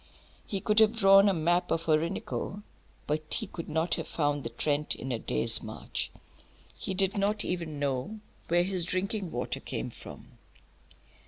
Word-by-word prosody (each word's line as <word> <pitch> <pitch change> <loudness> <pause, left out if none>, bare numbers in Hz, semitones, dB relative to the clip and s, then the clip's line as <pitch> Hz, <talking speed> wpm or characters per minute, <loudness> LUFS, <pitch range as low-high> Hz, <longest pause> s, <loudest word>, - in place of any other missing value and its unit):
He 195 -2 -3
could 210 +2 +3
have 220 +1 +5
drawn 195 -1 +7
a - - +4
map 175 +1 +2
of 165 - 0
the 160 - +2
Orinoco, 170 +5 -1 0.4
but 155 +1 -2
he 225 - -1
could 170 -4 -7
not 160 +3 0
have - - -2
found 145 -2 0
the - - -3
Trent 150 0 0
in 130 - -5
a 120 - -1
day's 65 - +1
march; - - -4 0.7
he 190 - -4
did 195 +1 +1
not 205 +2 +1
even 170 -4 -3
know 140 +9 -2 0.3
where 175 +1 +4
his 185 -1 0
drinking 185 +2 -2
water 125 -4 -3
came - - -4
from. - - -12
175 Hz, 170 wpm, -30 LUFS, 155-195 Hz, 0.7 s, drawn